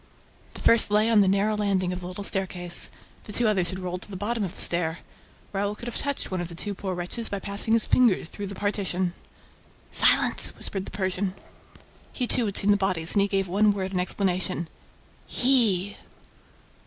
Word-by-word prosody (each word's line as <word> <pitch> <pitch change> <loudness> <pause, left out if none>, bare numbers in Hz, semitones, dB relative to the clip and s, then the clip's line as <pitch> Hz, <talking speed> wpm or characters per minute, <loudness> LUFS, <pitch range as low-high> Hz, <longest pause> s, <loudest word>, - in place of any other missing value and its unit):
The - - -8
first 230 -2 +5
lay 210 +2 +3
on 215 -2 +6
the 195 - +3
narrow 200 +3 +2
landing 195 -3 0
of 180 - -5
the 175 - -7
little 185 +3 -6
staircase; 180 -3 0 0.4
the - - -8
two 235 +2 +1
others 190 -5 +2
had 185 - -5
rolled 180 -1 -5
to - - -9
the 195 - -6
bottom 220 +3 -2
of 185 - -5
the - - -7
staircase. 170 -1 0 0.5
Raoul 205 +1 -1
could 235 - -10
have 240 - -4
touched 280 -6 -2
one 185 -1 -2
of 175 - -4
the 170 - -10
two 205 +4 -3
poor 190 -1 -4
wretches 180 +7 -3
by 200 - -3
passing 200 +3 -1
his 230 -1 +4
fingers 230 -9 +3
through 200 +3 -7
the 200 - -7
partition. 190 -3 -1 0.8
"Silence!" - - +4
whispered 195 -1 -1
the - - -8
Persian. 190 0 -2 0.8
He 250 - -2
too 240 0 +2
had 200 - 0
seen 205 - +3
the 205 - +4
bodies 185 -4 0
and 205 - +3
he 200 - +2
gave 195 -1 0
one 205 +3 +3
word 190 -1 -3
in 185 - -1
explanation: 185 -2 -1 0.6
"HE!" 215 -7 +2
195 Hz, 205 wpm, -25 LUFS, 185-210 Hz, 0.8 s, on